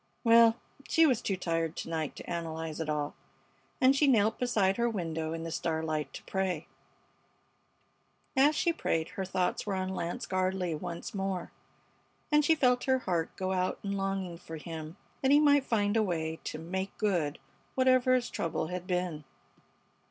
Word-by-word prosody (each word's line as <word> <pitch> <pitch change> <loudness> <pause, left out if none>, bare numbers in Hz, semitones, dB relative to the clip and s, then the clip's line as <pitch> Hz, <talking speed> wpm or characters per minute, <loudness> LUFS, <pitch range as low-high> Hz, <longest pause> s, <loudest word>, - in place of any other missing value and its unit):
Well, 230 -1 +7 0.3
she 325 - +5
was 255 -6 +3
too 195 -5 -1
tired 165 -2 -1
to - - -5
night 160 -3 -2
to - - -10
analyze 160 -2 -4
it 160 -1 -3
all, 150 -1 -1 0.7
and 260 +1 +5
she 290 +1 +4
knelt 225 -4 +3
beside 205 -6 +2
her 235 0 +2
window 165 -6 -3
in 165 0 -4
the 165 - -5
starlight 160 -3 -2
to - - -8
pray. 185 -4 -2 1.7
As 285 +3 +5
she 340 - +2
prayed 165 - -1
her 190 - -4
thoughts 185 +2 -1
were 200 - 0
on 185 0 -2
Lance 175 -2 -3
Gardley 185 -2 0
once 170 +2 -5
more, 195 -2 -3 0.8
and 300 0 +5
she 320 +2 +4
felt 250 -4 +2
her 260 -1 +3
heart 175 -9 -1
go 190 -1 -2
out 185 0 0
in 200 - -2
longing 195 -3 -2
for 165 -2 -8
him, 160 +1 -7 0.2
that 265 - +2
he 290 +1 +7
might 285 -2 +5
find 205 -2 +1
a 225 - +4
way 160 -5 -2
to - - -4
"make 190 +4 -4
good," 175 -8 0 0.4
whatever 255 -1 +4
his 245 -1 -1
trouble 160 -1 -2
had 180 0 -5
been. 180 -4 -1
185 Hz, 175 wpm, -30 LUFS, 165-230 Hz, 1.7 s, Well